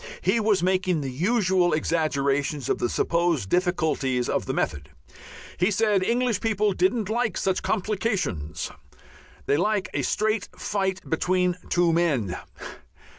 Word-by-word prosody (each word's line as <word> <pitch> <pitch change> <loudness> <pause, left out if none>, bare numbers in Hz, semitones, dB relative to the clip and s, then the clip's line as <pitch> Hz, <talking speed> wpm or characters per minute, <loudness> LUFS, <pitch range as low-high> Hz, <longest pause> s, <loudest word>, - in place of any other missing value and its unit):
He 205 +5 +2
was 210 -4 +2
making 185 -3 +1
the 135 -2 -4
usual 185 - +2
exaggerations 145 -3 0
of - - +1
the 120 - 0
supposed 170 - 0
difficulties 160 -8 +1
of - - -1
the - - 0
method. 70 -2 -2 0.7
He 180 +3 +2
said 210 -1 +2
English 235 +1 +1
people 210 -2 +1
didn't 190 +4 +1
like 220 -2 -1
such 190 -1 0
"complications." 190 - -2 0.7
They 140 - +2
like 205 +3 0
a - - 0
"straight 215 -1 0
fight 190 -2 -2
between 180 +2 +1
two 175 -1 +3
men." 140 - +1
180 Hz, 130 wpm, -25 LUFS, 155-205 Hz, 0.7 s, two